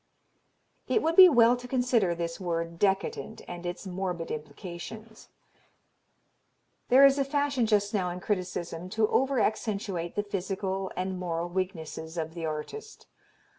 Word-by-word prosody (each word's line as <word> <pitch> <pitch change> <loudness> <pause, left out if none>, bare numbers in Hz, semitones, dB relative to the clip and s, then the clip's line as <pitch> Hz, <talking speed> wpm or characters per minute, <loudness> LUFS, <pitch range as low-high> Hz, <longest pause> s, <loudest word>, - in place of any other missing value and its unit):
It 440 - +2
would 325 +1 +1
be 370 0 +11
well 240 -4 +6
to 250 0 -9
consider 245 -8 +2
this 170 0 -4
word 170 -2 -3
"decadent" 195 +2 -1
and 175 0 -6
its 175 +3 -5
morbid 180 -2 -3
implications. 185 +8 -8 1.6
There 265 +3 +8
is 275 0 +5
a - - +3
fashion 280 -3 0
just 205 -1 +2
now 185 -4 0
in 175 +1 -5
criticism 180 -3 -3
to 220 -1 +4
over 270 0 +2
accentuate 200 -6 -1
the 205 - 0
physical 195 -1 -3
and 185 0 -2
moral 170 -1 -2
weaknesses 170 -3 -4
of 160 -1 -3
the 165 -2 -4
artist. 295 - -6
190 Hz, 140 wpm, -28 LUFS, 175-230 Hz, 1.6 s, be